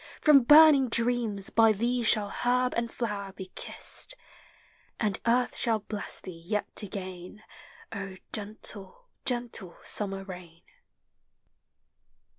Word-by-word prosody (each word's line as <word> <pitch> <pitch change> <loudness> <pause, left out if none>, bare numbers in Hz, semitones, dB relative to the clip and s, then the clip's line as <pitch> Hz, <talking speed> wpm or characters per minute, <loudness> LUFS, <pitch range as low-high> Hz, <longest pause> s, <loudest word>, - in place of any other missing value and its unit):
from 295 -3 +6
burning 295 0 +7
dreams 230 -4 0
By 225 -1 +5
thee 240 +4 -1
shall 215 -3 +2
herb 250 +3 0
and 235 0 -1
flower 205 -4 -4
be 190 -1 -9
kissed, - - -3 0.8
And 210 -4 -1
Earth 245 +1 +2
shall 225 -2 +2
bless 210 0 -2
thee 165 -3 -11
}et 210 - -1
again, 190 0 -8 0.9
gentle, 215 - -4 0.2
gentle 240 -7 -1
summer 195 -2 -1
rain. 180 -3 -11
215 Hz, 105 wpm, -28 LUFS, 195-245 Hz, 0.9 s, burning